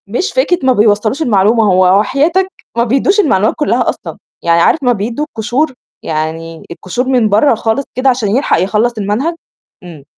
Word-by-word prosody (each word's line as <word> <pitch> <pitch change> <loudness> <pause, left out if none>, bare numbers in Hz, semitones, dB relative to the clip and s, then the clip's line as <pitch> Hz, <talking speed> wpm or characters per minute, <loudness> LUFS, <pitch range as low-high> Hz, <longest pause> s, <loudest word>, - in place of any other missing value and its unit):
مش 245 - -2
فكرة 430 -8 +1
ما 260 - +4
بيوصّلوش 215 +5 +1
المعلومة، 220 -3 +2
هو 185 -1 +3
وحياتك 320 - +1 0.3
ما 235 - +3
بيدّوش 275 - +1
المعلومات 220 - +2
كلّها 295 - 0
أصلًا، - - -6 0.3
يعني 170 0 +2
عارف 300 - +2
ما 250 - +3
بيدّوا 230 +7 -3
القشور، 260 +3 -2 0.3
يعني 160 +1 -4
القشور 185 +8 -4
من 250 -5 +2
برّه 220 +6 +3
خالص 225 +5 -1
كده 255 +1 +2
عشان 245 -5 -1
يلحق 270 - +1
يخلّص 210 +5 0
المنهج، 215 +11 -2 0.5
إمم. 165 -5 -12
225 Hz, 165 wpm, -13 LUFS, 195-275 Hz, 0.5 s, ما